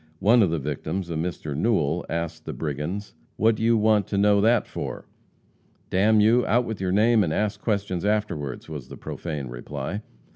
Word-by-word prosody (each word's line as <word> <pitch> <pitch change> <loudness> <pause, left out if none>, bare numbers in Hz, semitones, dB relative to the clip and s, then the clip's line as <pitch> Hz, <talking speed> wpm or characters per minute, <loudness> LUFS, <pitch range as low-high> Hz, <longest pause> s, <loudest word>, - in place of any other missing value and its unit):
One 115 +7 +5
of 95 - +4
the 85 - 0
victims, 80 +5 -3
a - - -1
Mr. 80 -3 -3
Newell, 85 -3 +1
asked 85 0 -4
the - - -4
brigands, 80 +7 -4 0.2
"What 115 +2 +3
do 110 - -6
you 115 0 +4
want 105 -2 +3
to 100 - -2
know 100 0 +4
that 115 +3 +3
for?" - - -6 0.9
"D 95 - +1
n 110 +2 +5
you, 115 +4 +4
out 120 +2 +3
with 110 -4 -5
your 95 -1 0
name, 110 +2 +4
and 80 - -1
ask 105 +3 -1
questions 100 -5 -1
afterward!" 100 -11 -2
was 75 -5 -7
the - - -9
profane 75 -5 -5
reply. 70 - -5
100 Hz, 190 wpm, -25 LUFS, 80-110 Hz, 0.9 s, One